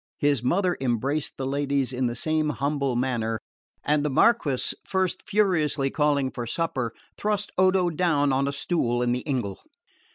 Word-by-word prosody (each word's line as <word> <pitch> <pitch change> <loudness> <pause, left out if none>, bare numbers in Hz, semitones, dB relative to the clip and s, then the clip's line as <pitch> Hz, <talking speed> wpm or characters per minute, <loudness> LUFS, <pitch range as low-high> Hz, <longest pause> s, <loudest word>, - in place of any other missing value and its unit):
His 145 -4 +2
mother 180 +7 +1
embraced 135 +4 -1
the 135 - -3
ladies 140 -1 0
in 125 0 0
the 120 - -3
same 155 +3 0
humble 140 0 -1
manner, 120 -3 -1 0.4
and 150 0 +2
the 150 - 0
Marquess, 145 - +2
first 190 -1 0
furiously 160 -9 +2
calling 145 -3 +1
for 120 -2 -5
supper, 130 -5 -1 0.3
thrust 210 -1 0
Odo 185 -1 +3
down 150 -4 +2
on 135 +1 +1
a - - 0
stool 125 -5 0
in 120 - +1
the 125 - 0
ingle. 115 -8 -2
140 Hz, 160 wpm, -25 LUFS, 130-165 Hz, 0.4 s, Odo